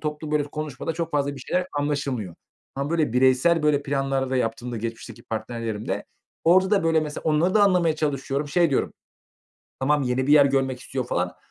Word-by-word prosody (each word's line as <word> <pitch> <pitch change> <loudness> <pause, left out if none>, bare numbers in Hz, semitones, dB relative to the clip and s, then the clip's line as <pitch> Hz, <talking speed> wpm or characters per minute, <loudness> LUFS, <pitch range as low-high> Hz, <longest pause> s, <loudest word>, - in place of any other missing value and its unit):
toplu, 150 0 -4
böyle, 150 -1 +2
konuşmada 150 0 -5
çok 165 0 -3
fazla 145 -1 0
bir 135 - -10
şeyler 180 +8 -1
anlaşılmıyor. 140 - -2 0.4
Ama, 140 +2 -3
böyle, 155 -7 +1
bireysel, 130 +6 +3
böyle, 150 -1 +2
planlar 135 -1 -1
da 130 - +1
yaptığımda, 120 0 -2
geçmişteki 115 +1 -6
partnerlerimde. 110 -1 -4 0.4
Orada 185 +3 +5
da, 200 -5 +2
böyle, 160 -1 +3
mesela, 150 -1 -5
onları 160 +4 +2
da 210 - +5
anlamaya 175 -5 +3
çalışıyorum. 140 -1 -2
Şey 170 +2 +2
diyorum: 135 - 0 0.9
"Tamam, 145 +2 +2
yeni 130 0 0
bir 145 - +4
yer 145 -2 +7
görmek 135 -2 0
istiyor." 130 -1 -4
falan. 90 -5 -2
140 Hz, 175 wpm, -24 LUFS, 125-155 Hz, 0.9 s, yer